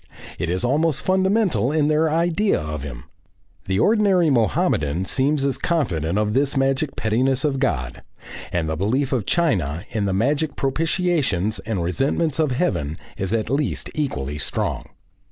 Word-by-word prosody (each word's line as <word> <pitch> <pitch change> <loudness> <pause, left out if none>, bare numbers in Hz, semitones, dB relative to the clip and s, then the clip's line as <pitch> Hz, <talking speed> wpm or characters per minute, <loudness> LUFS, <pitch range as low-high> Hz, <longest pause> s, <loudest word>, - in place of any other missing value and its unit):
It 85 - -2
is 90 +5 -1
almost 150 +4 +1
fundamental 190 - +2
in 150 -1 +2
their 155 +1 +2
idea 170 - +1
of 75 -2 -5
him. 65 -4 -7 0.6
The 95 0 0
ordinary 195 - +3
Mohammedan 95 - +1
seems 135 +6 +1
as 135 -1 -1
confident 90 - 0
of 105 0 0
this 140 +2 +1
magic 135 +2 0
pettiness 125 +4 +1
of 140 -3 0
God, 65 - -1 0.5
and 85 -2 -1
the 80 - -1
belief 125 - 0
of 120 -7 -1
China 95 - 0
in 105 -2 -1
the 100 - 0
magic 145 +9 0
propitiations 140 - 0
and 100 -6 -1
resentments 135 - 0
of 155 -2 +2
"Heaven" 120 - -1 0.2
is 95 0 -3
at 110 0 -1
least 140 +1 -1
equally 75 - -3
strong. - - -2
130 Hz, 155 wpm, -22 LUFS, 95-155 Hz, 0.6 s, ordinary